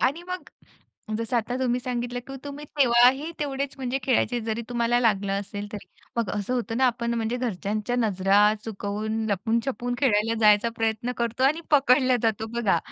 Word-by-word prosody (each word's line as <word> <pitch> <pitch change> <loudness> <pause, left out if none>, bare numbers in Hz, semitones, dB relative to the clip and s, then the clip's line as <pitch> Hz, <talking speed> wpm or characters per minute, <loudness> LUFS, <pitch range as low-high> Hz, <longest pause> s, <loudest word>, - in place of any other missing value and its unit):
आणि 280 +7 +1
मग 365 0 -5 0.7
जसं 230 +2 -1
आता 240 +2 -1
तुम्ही 250 -1 0
सांगितलं 245 0 -3
की 270 - -7
तुम्ही 285 +1 -7
तेव्हाही 255 +4 +5
तेवढेच 275 -1 -2
म्हणजे 260 0 -2
खेळायचे, 245 -2 +1
जरी 225 +1 -3
तुम्हाला 240 0 +1
लागलं 205 -4 +1
असेल 205 +1 -6
तरी. 210 - -7 0.3
मग 230 -4 0
असं 205 +5 -2
होतं 230 -2 -2
ना, 260 - +4
आपण 235 -1 -1
म्हणजे 230 +1 -1
घरच्यांच्या 215 0 -2
नजरा 200 -4 +2 0.3
चुकवून, 215 +1 -3
लपून-छपून 235 +5 -1
खेळायला 225 -4 +2
जायचा 210 +1 +5
प्रयत्न 225 +2 -1
करतो 235 +2 -1
आणि 305 +5 +3
पकडल्या 260 -3 +4
जातो 220 -1 0
बघा. 195 -6 +3
235 Hz, 165 wpm, -25 LUFS, 220-255 Hz, 0.7 s, तेव्हाही